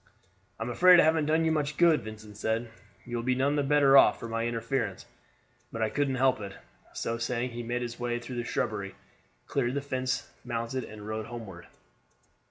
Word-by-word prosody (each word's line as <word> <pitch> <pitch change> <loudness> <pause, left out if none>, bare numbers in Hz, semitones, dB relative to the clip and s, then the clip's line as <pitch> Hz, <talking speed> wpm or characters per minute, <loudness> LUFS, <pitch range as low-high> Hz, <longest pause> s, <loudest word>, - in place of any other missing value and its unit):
"I - - -2
am 120 - -3
afraid 180 +7 +7
I - - +7
haven't 160 -1 +2
done 160 +1 +2
you 160 - +2
much 150 -1 -1
good," 170 -3 +5
Vincent 110 -1 -10
said. 110 +2 -2 0.3
"You 120 0 -4
will 115 - -3
be 130 +1 +1
none 140 +3 +1
the 145 - +2
better 140 -1 +4
off 135 - +7
for 115 - -6
my 115 0 -1
interference; 115 -3 -2 0.7
but 115 -1 -2
I 110 - 0
couldn't 140 -2 0
help 130 -2 +2
it." 100 -1 -7 0.4
So 115 0 -3
saying 120 +1 -2
he 120 +1 -5
made 120 +1 -2
his 120 0 -6
way 120 0 -1
through 120 +1 -7
the 120 - -1
shrubbery, 105 -4 -3 0.5
cleared 120 +2 -1
the 140 - 0
fence, 130 -2 -2
mounted, 120 +1 -3
and 105 -1 -10
rode 110 0 -4
homeward. 110 -7 -9
120 Hz, 200 wpm, -29 LUFS, 115-135 Hz, 0.7 s, afraid